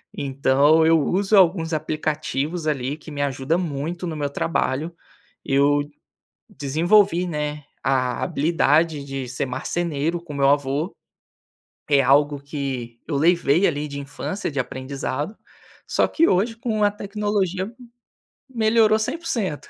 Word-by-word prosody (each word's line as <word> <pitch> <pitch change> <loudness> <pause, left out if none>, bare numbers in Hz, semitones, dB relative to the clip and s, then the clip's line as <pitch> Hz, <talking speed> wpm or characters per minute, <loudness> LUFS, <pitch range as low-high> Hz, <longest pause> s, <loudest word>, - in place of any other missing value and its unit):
Então, 140 +3 +3
eu 165 0 +5
uso 195 +7 +1
alguns 170 -3 +4
aplicativos 155 +1 -2
ali 140 -1 -1
que 155 - -13
me 145 -1 -4
ajuda 140 +4 0
muito 170 +2 -3
no 160 - -4
meu 145 -1 -2
trabalho. 160 +2 -1 0.5
Eu 145 +1 +3 0.7
desenvolvi, 175 +6 +2
né, 150 -2 -3 0.2
a 130 -2 0
habilidade 160 -2 +2
de 135 -2 -5
ser 125 +2 -3
marceneiro 165 +4 -2
com 160 - -10
meu 140 -1 +2
avó, 145 +3 +1 1.0
é 140 -2 +5
algo 145 +2 +3
que 135 -5 -5
eu 150 - -2
levei 170 +2 +3
ali 150 -2 0
de 140 0 -6
infância, 145 +6 -5
de 140 - -3
aprendizado, 135 - -4 0.5
só - - +2
que 330 +1 +2
hoje 220 +5 +1
com 225 -3 -1
a 205 - +4
tecnologia 205 -1 -2 0.8
melhorou 220 -2 +3
100%. 225 - -3
155 Hz, 130 wpm, -22 LUFS, 140-180 Hz, 1.0 s, eu